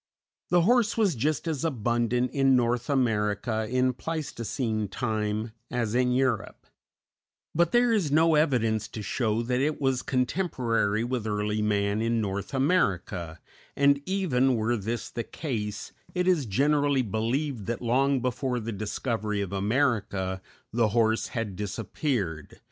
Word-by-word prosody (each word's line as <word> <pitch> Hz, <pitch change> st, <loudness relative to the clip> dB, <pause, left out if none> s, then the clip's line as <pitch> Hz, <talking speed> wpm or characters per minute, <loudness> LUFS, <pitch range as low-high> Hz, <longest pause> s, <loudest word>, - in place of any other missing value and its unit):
The 175 Hz, -1 st, +4 dB
horse 230 Hz, +2 st, +3 dB
was 210 Hz, -6 st, +3 dB
just 150 Hz, +7 st, -1 dB
as 155 Hz, -3 st, -2 dB
abundant 120 Hz, -3 st, 0 dB
in 135 Hz, -2 st, +3 dB
North 120 Hz, 0 st, +1 dB
America 110 Hz, -4 st, 0 dB
in 130 Hz, +1 st, +2 dB
Pleistocene 120 Hz, -7 st, -3 dB
time 110 Hz, +1 st, -2 dB, 0.2 s
as 115 Hz, -3 st, -1 dB
in 125 Hz, 0 st, +2 dB
Europe; 125 Hz, -3 st, -1 dB, 0.9 s
but 170 Hz, +1 st, +2 dB
there 240 Hz, -1 st, +4 dB
is 185 Hz, -10 st, +1 dB
no 160 Hz, +2 st, +4 dB
evidence 120 Hz, -8 st, +2 dB
to 110 Hz, -, -7 dB
show 110 Hz, +2 st, 0 dB
that 125 Hz, +1 st, 0 dB
it 150 Hz, +2 st, 0 dB
was 135 Hz, -2 st, +1 dB
contemporary 125 Hz, -, 0 dB
with 120 Hz, -2 st, -2 dB
early 105 Hz, 0 st, -1 dB
man 105 Hz, 0 st, +1 dB
in 115 Hz, 0 st, +1 dB
North 100 Hz, -2 st, -3 dB
America, 95 Hz, -, 0 dB, 0.4 s
and, 140 Hz, 0 st, +4 dB
even 135 Hz, -10 st, +2 dB
were 115 Hz, +2 st, +1 dB
this 115 Hz, +2 st, -3 dB
the 115 Hz, -, -3 dB
case, 105 Hz, -10 st, -4 dB, 0.2 s
it 180 Hz, 0 st, +1 dB
is 165 Hz, -9 st, +2 dB
generally 140 Hz, +4 st, +2 dB
believed 115 Hz, +2 st, -2 dB
that 120 Hz, 0 st, -2 dB
long 135 Hz, +3 st, +2 dB
before 125 Hz, 0 st, -1 dB
the 115 Hz, 0 st, -4 dB
discovery 110 Hz, 0 st, -2 dB
of 100 Hz, -1 st, -3 dB
America 100 Hz, -4 st, 0 dB, 0.3 s
the 115 Hz, -1 st, +3 dB
horse 110 Hz, +1 st, +2 dB
had 115 Hz, -5 st, -4 dB
disappeared. 100 Hz, -, -3 dB
120 Hz, 140 wpm, -27 LUFS, 105-140 Hz, 0.9 s, The